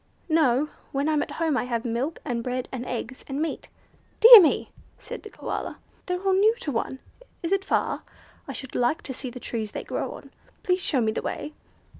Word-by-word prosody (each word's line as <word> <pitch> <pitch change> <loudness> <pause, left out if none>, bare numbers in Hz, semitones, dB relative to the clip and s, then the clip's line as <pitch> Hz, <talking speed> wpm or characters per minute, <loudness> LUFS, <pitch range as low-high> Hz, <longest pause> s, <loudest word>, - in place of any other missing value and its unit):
"No. 300 -3 +3 0.2
When 280 +2 0
I'm 305 -2 +2
at - - -4
home 325 -3 +1
I 250 - 0
have 235 -2 -2
milk, 245 +7 -2
and 240 -5 -2
bread, 255 +1 -3
and 255 -1 -5
eggs, 255 +1 -5
and 275 0 -3
meat." 320 +1 -3 0.5
"Dear 460 -1 +12
me!" 315 - +1 0.3
said - - -8
the 430 - -10
Koala. - - -5 0.3
"They're 360 -1 -1
all 385 -1 +3
new 420 +4 +4
to 295 - -2
one. 250 +2 -2 0.5
Is 335 - -2
it 390 0 +2
far? - - 0 0.5
I - - -5
should 265 - -8
like 245 +6 +1
to 265 - -5
see 255 0 -4
the 250 +1 -9
trees 220 -3 -4
they - - -4
grow - - -3
on. - - -12 0.3
Please 365 0 +1
show 270 -8 +1
me 220 -1 +2
the - - -3
way." 300 - -5
275 Hz, 210 wpm, -26 LUFS, 245-330 Hz, 0.5 s, Dear